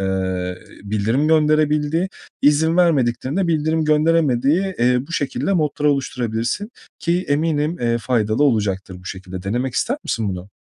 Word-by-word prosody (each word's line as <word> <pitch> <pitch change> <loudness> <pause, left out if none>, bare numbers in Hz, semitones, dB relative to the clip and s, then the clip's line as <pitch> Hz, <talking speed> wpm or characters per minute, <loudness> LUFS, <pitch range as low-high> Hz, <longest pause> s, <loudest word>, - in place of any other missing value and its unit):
eee, 95 -1 -2 0.2
bildirim 110 +8 0
gönderebildiği, 155 +2 +2 0.3
izin 160 +3 +3
vermediklerinin 140 -5 +2
de 185 - +1
bildirim 160 -1 +1
gönderemediği, 155 +3 +2
eee, 125 +1 +3
bu 165 - -10
şekilde 150 +6 -1
modlar 150 -4 -1
oluşturabilirsin, 125 - -1 0.3
ki 175 +2 0
eminim, 150 +2 0
eee, 120 -1 +1
faydalı 115 +1 +1
olacaktır 100 -7 0
bu - - -18
şekilde. 95 -1 -7
Denemek 120 +6 -2
ister 260 - 0
misin 110 -3 -1
bunu? 90 0 -5
140 Hz, 135 wpm, -20 LUFS, 110-160 Hz, 0.3 s, izin